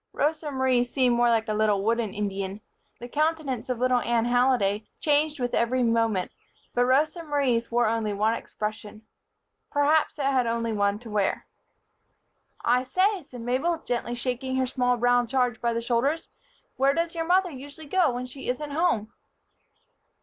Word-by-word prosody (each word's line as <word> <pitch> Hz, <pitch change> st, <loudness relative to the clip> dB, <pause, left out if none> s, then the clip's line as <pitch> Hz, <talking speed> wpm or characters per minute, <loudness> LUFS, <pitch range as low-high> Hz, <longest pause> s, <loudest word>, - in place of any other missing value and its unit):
Rosa 300 Hz, +1 st, -1 dB
Marie 260 Hz, -3 st, +2 dB
seemed 245 Hz, 0 st, +1 dB
more 240 Hz, 0 st, +3 dB
like 225 Hz, -1 st, +1 dB
a 215 Hz, -, -1 dB
little 210 Hz, -2 st, +1 dB
wooden 225 Hz, -1 st, 0 dB
Indian. 200 Hz, 0 st, -4 dB, 0.4 s
The 240 Hz, -, -7 dB
countenance 300 Hz, -3 st, -1 dB
of 250 Hz, -, -1 dB
little 250 Hz, +1 st, +2 dB
Anne 235 Hz, -1 st, +1 dB
Halliday 240 Hz, -4 st, +2 dB
changed 300 Hz, 0 st, +1 dB
with 245 Hz, -1 st, -2 dB
every 250 Hz, +2 st, +1 dB
moment; 230 Hz, -5 st, +1 dB, 0.4 s
but 245 Hz, 0 st, +2 dB
Rosa 300 Hz, +6 st, +2 dB
Marie's 275 Hz, -7 st, 0 dB
wore 240 Hz, 0 st, +2 dB
only 220 Hz, -1 st, 0 dB
one 210 Hz, +2 st, +1 dB
expression. 215 Hz, -1 st, -6 dB, 0.7 s
Perhaps 295 Hz, +2 st, +2 dB
it 285 Hz, -, -2 dB
had 260 Hz, -3 st, +2 dB
only 230 Hz, 0 st, -1 dB
one 200 Hz, -1 st, +1 dB
to 225 Hz, 0 st, -11 dB
wear. 205 Hz, -2 st, 0 dB, 1.2 s
"I 245 Hz, +1 st, +3 dB
say," 375 Hz, +9 st, +1 dB
said 245 Hz, -2 st, -9 dB
Mabel, 260 Hz, +9 st, 0 dB
gently 240 Hz, -5 st, -3 dB
shaking 255 Hz, +1 st, -3 dB
her 260 Hz, 0 st, +1 dB
small 250 Hz, -1 st, 0 dB
brown 245 Hz, 0 st, +3 dB
charge 250 Hz, -2 st, 0 dB
by 235 Hz, -, +1 dB
the 230 Hz, 0 st, -2 dB
shoulders, 255 Hz, +7 st, 0 dB, 0.5 s
"where 275 Hz, +1 st, +3 dB
does 335 Hz, 0 st, -1 dB
your 330 Hz, -1 st, -2 dB
mother 365 Hz, +1 st, +3 dB
usually 285 Hz, +3 st, -10 dB
go 350 Hz, +2 st, +2 dB
when 245 Hz, +1 st, -4 dB
she 255 Hz, +1 st, -8 dB
isn't 290 Hz, +4 st, -3 dB
home?" 285 Hz, -9 st, 0 dB
245 Hz, 165 wpm, -26 LUFS, 230-285 Hz, 1.2 s, more